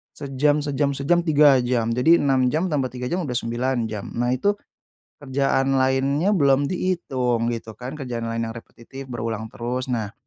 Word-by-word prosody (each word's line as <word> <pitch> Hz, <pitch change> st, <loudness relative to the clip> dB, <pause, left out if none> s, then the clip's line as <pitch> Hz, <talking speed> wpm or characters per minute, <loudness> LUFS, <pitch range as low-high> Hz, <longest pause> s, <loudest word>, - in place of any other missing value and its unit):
sejam 145 Hz, +2 st, +1 dB
sejam 145 Hz, 0 st, 0 dB
sejam, 170 Hz, +6 st, +1 dB
3 150 Hz, -3 st, +5 dB
jam. 120 Hz, -2 st, 0 dB
Jadi, 160 Hz, +8 st, +5 dB
6 130 Hz, -2 st, +2 dB
jam 165 Hz, +5 st, 0 dB
tambah 135 Hz, -4 st, 0 dB
3 125 Hz, 0 st, -5 dB
jam 180 Hz, +1 st, -1 dB
udah 125 Hz, -5 st, -4 dB
9 120 Hz, 0 st, -1 dB
jam. 105 Hz, -2 st, -6 dB
Nah, 120 Hz, +1 st, +1 dB
itu 200 Hz, +11 st, +2 dB, 0.7 s
kerjaan 135 Hz, 0 st, +1 dB
lainnya 135 Hz, +7 st, +2 dB
belum 140 Hz, -3 st, +3 dB
dihitung, 130 Hz, -11 st, -1 dB
gitu 115 Hz, -1 st, -7 dB
kan, 130 Hz, +4 st, -6 dB
kerjaan 120 Hz, -5 st, -4 dB
lain 115 Hz, 0 st, -2 dB
yang -, -, -8 dB
repetitif, 130 Hz, +3 st, -11 dB
berulang 115 Hz, -2 st, -4 dB
terus. 125 Hz, +2 st, -4 dB
Nah, 110 Hz, -5 st, -2 dB
130 Hz, 170 wpm, -23 LUFS, 120-145 Hz, 0.7 s, 3